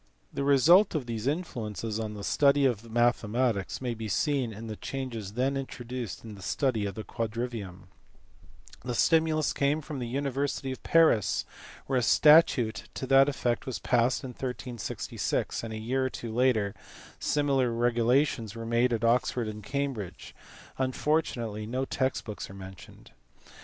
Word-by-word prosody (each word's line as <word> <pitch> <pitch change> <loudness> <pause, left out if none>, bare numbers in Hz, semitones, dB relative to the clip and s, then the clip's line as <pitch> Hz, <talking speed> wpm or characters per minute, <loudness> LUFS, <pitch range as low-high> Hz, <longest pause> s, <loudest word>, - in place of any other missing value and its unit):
The - - -2
result 155 - +5
of 145 -5 -1
these 115 0 -4
influences 115 - -3
on 110 -1 -4
the 100 - -7
study 140 +4 +3
of 115 -3 0
mathematics 120 -2 +1
may 125 -2 -2
be 110 -1 -6
seen 130 - 0
in 110 +2 -8
the 110 -1 -5
changes 115 -6 -5
then 130 +4 0
introduced 125 -4 -5
in 110 -2 -8
the 100 - -11
study 110 +3 0
of 100 - -6
the 110 - -5
quadrivium* 110 -6 -5 1.0
The 125 -1 -3
stimulus 160 +1 +3
came 140 +2 +1
from 150 -2 -6
the 120 - -3
university 135 +1 -2
of 130 - -7
Paris, 160 - +3 0.4
where 130 -2 +1
a - - 0
statute 125 -4 +4
to - - -3
that 135 +1 +5
effect 125 -4 -1
was 130 - -2
passed 125 +1 +1
in 130 - -5
1366, 125 -4 -3
and 115 - -5
a 110 - -4
year 130 +4 0
or - - -3
two 115 -3 -6
later 115 -5 +2 0.5
similar 140 -4 +1
regulations 120 0 +1
were 115 0 -6
made 120 +2 +2
at 115 0 -1
Oxford 120 0 +2
and 105 0 -6
Cambridge; 115 -8 -4 0.5
unfortunately 130 -6 -1
no 130 +3 -1
text 130 0 -1
books 105 -2 -6
are 95 - -10
mentioned. 95 -1 -12
120 Hz, 155 wpm, -28 LUFS, 110-135 Hz, 1.0 s, result